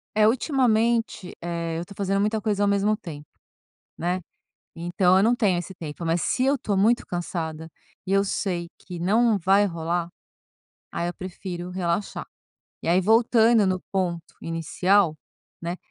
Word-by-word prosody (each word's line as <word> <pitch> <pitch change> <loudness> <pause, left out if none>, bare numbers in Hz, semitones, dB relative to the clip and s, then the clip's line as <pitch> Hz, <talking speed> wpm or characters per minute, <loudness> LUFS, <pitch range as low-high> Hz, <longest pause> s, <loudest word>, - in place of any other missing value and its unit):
É, 215 0 +5
ultimamente, 235 - +1
eh, 170 -1 -3
eu 165 - -3
estou 200 +2 -13
fazendo 195 0 0
muita 215 +1 0
coisa 205 -2 0
ao 205 - +3
mesmo 200 +1 +2
tempo, 150 -6 -9 0.7
né. 180 +2 -1 0.6
Então 175 +2 +2
eu 195 - +4
não 235 +2 +4
tenho 200 -7 +2
esse 175 +2 -5
tempo, 165 0 -7
mas 165 +1 +1
se 255 - 0
eu 280 +1 +3
estou 210 -5 -2
muito 225 +5 +3
cansada 160 -2 -4 0.4
e 190 - -3
eu 195 0 +4
sei 180 -3 -2
que 180 -2 -9
não 215 +4 +3
vai 195 +3 +4
rolar, 170 -1 -2 0.8
aí 170 - -2
eu - - -5
prefiro 180 -1 -6
relaxar. 180 +1 -2 0.6
E - - -3
aí, 175 +2 +4
voltando 225 +1 +4
no 185 -1 0
ponto 175 -3 -1 0.2
inicial, 165 +2 +1 0.4
né, 170 +1 -3
185 Hz, 160 wpm, -25 LUFS, 170-210 Hz, 0.8 s, É